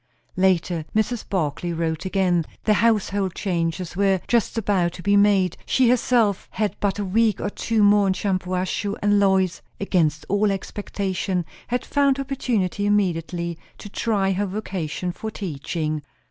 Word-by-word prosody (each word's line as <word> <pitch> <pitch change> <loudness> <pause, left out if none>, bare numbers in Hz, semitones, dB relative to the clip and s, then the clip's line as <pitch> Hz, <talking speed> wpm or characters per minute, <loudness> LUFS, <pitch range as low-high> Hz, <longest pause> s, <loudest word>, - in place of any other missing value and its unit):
Later, 180 -3 +2
Mrs. 220 +2 0
Barclay 170 -2 -1
wrote 165 +1 -2
again. 185 -3 +2 0.2
The 215 - +3
household 205 -4 +1
changes 170 -1 -2
were 195 0 +2
just 235 -1 +1
about 190 -5 +1
to 175 - -10
be 200 0 +3
made; 200 -3 +3
she 255 -3 +3
herself 235 -5 +2
had 210 -2 -2
but 200 -1 0
a 205 - -2
week 220 +3 +2
or 205 - -2
two 225 0 0
more 205 0 +5
in 190 - +3
Shampuashuh; 185 +1 -2
and 205 0 +4
Lois, 190 -2 +2 0.2
against 165 -6 +1
all 205 +1 +2
expectation, 195 -2 -3 0.2
had 245 +1 -2
found 280 -2 +2
opportunity 230 -8 -1
immediately 170 -4 0 0.2
to 205 - -9
try 200 -2 0
her 200 +2 0
vocation 185 -4 -3
for 220 +5 -6
teaching. 155 -5 -3
195 Hz, 145 wpm, -23 LUFS, 180-210 Hz, 0.2 s, more